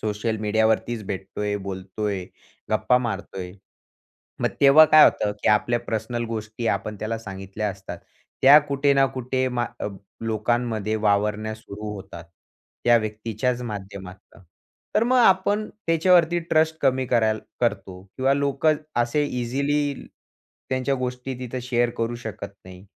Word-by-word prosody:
Social 110 Hz, +1 st, -2 dB
मीडियावरतीच 110 Hz, +1 st, +1 dB
भेटतोय, 100 Hz, +2 st, -3 dB
बोलतोय, 95 Hz, 0 st, -4 dB, 0.5 s
गप्पा 125 Hz, -, +3 dB
मारतोय. 95 Hz, -5 st, -5 dB, 0.9 s
मग -, -, +2 dB
तेव्हा 140 Hz, +3 st, +8 dB
काय 155 Hz, +1 st, +8 dB
होतं, 105 Hz, -, +2 dB
की -, -, +2 dB
आपल्या 120 Hz, +3 st, +3 dB
पर्सनल 120 Hz, +1 st, -3 dB
गोष्टी 110 Hz, 0 st, -5 dB
आपण 105 Hz, 0 st, -2 dB
त्याला 110 Hz, +1 st, -2 dB
सांगितल्या 95 Hz, 0 st, -5 dB
असतात. 95 Hz, 0 st, -8 dB, 0.4 s
त्या 140 Hz, +3 st, +9 dB
कुठे 140 Hz, -1 st, +1 dB
ना 135 Hz, 0 st, +4 dB
कुठे 130 Hz, 0 st, -1 dB
मा 120 Hz, -1 st, -1 dB, 0.2 s
अ, -, -, -2 dB, 0.3 s
लोकांमध्ये 110 Hz, -1 st, -1 dB
वावरणे 105 Hz, +1 st, 0 dB
सुरू 105 Hz, -1 st, -8 dB
होतात, 95 Hz, -4 st, -9 dB, 0.6 s
त्या 120 Hz, 0 st, +6 dB
व्यक्तीच्याच 110 Hz, +3 st, -2 dB
माध्यमातनं. 100 Hz, -3 st, -9 dB, 0.5 s
तर -, -, +3 dB
मग 255 Hz, +2 st, +2 dB
आपण 205 Hz, -1 st, +3 dB, 0.2 s
त्याच्यावरती 170 Hz, +1 st, +4 dB
ट्रस्ट 160 Hz, 0 st, +3 dB
कमी 130 Hz, -1 st, +2 dB
करायला 110 Hz, -3 st, +2 dB, 0.2 s
करतो 100 Hz, -5 st, -2 dB
किंवा 135 Hz, +1 st, +2 dB
लोक 140 Hz, +1 st, -1 dB, 0.3 s
असे 120 Hz, +5 st, +1 dB
इझिली 140 Hz, +3 st, -1 dB, 0.8 s
त्यांच्या 130 Hz, +1 st, 0 dB
गोष्टी 125 Hz, 0 st, -4 dB
तिथं 130 Hz, 0 st, -5 dB
शेअर 120 Hz, -1 st, +1 dB
करू 115 Hz, +1 st, -1 dB
शकत 110 Hz, -4 st, -7 dB, 0.2 s
नाही. 95 Hz, 0 st, -12 dB
115 Hz, 130 wpm, -24 LUFS, 105-130 Hz, 0.9 s, त्या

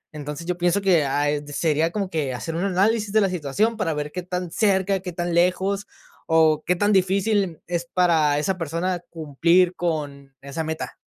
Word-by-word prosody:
Entonces, 150 Hz, +2 st, -6 dB
yo 180 Hz, 0 st, -2 dB
pienso 175 Hz, +3 st, +2 dB
que, 180 Hz, -5 st, +3 dB
ah, 145 Hz, +2 st, 0 dB
eh, 145 Hz, 0 st, -1 dB
sería 155 Hz, +2 st, 0 dB
como 200 Hz, -2 st, -2 dB
que 145 Hz, -6 st, -2 dB
hacer 125 Hz, +8 st, -5 dB
un 170 Hz, -, -1 dB
análisis 200 Hz, +2 st, +1 dB
de 220 Hz, -, +4 dB
la 195 Hz, -, +2 dB
situación 180 Hz, +7 st, 0 dB
para 165 Hz, -7 st, -1 dB
ver 150 Hz, 0 st, -4 dB
qué 180 Hz, -, -3 dB
tan 180 Hz, -1 st, -4 dB
cerca, 195 Hz, -1 st, +1 dB
qué 180 Hz, -1 st, -6 dB
tan 175 Hz, 0 st, -3 dB
lejos 190 Hz, +4 st, +1 dB, 0.4 s
o 160 Hz, -1 st, +3 dB
qué 180 Hz, -, +3 dB
tan 205 Hz, +3 st, +2 dB
difícil 195 Hz, +2 st, +2 dB
n 170 Hz, -4 st, -7 dB
es 175 Hz, -1 st, -3 dB
para 160 Hz, -5 st, +3 dB
esa 180 Hz, +5 st, 0 dB
persona 170 Hz, +3 st, -2 dB
cumplir 170 Hz, +3 st, +2 dB
con 145 Hz, -5 st, -4 dB
esa 140 Hz, +3 st, -4 dB
meta. 160 Hz, 0 st, -5 dB
175 Hz, 195 wpm, -23 LUFS, 155-190 Hz, 0.4 s, de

